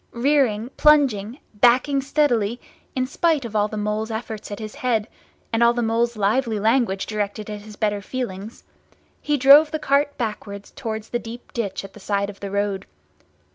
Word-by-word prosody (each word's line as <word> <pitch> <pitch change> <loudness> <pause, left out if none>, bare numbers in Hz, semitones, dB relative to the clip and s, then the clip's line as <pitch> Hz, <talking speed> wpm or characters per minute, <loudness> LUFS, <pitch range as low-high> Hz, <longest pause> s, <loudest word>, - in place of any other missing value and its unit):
Rearing, 245 -3 +1
plunging, 260 -7 +3 0.2
backing 250 +6 +3
steadily, 245 -6 +1 0.4
in 255 -1 +1
spite 300 0 +1
of 220 -2 -7
all 210 0 +3
the 215 - -6
Mole's 210 +1 -2
efforts 220 -1 -5
at 205 - -5
his 215 -2 -7
head, 230 -4 0 0.5
and 225 - +1
all 235 0 +5
the 240 - 0
Mole's 230 +1 0
lively 220 +2 +1
language 220 -3 +1
directed 210 0 -3
at 210 -1 -6
his 210 0 -12
better 205 -1 -1
feelings, 215 -2 -6 0.6
he 295 -1 0
drove 285 +3 +8
the 310 - -2
cart 285 0 +1
backwards 210 -3 -5
towards 220 -5 -5
the 240 - -1
deep 235 +1 -10
ditch 205 -6 -3
at 195 - -12
the - - -13
side 200 0 -1
of 200 - -19
the 200 - -5
road. 200 -1 -2
225 Hz, 175 wpm, -22 LUFS, 205-255 Hz, 0.6 s, drove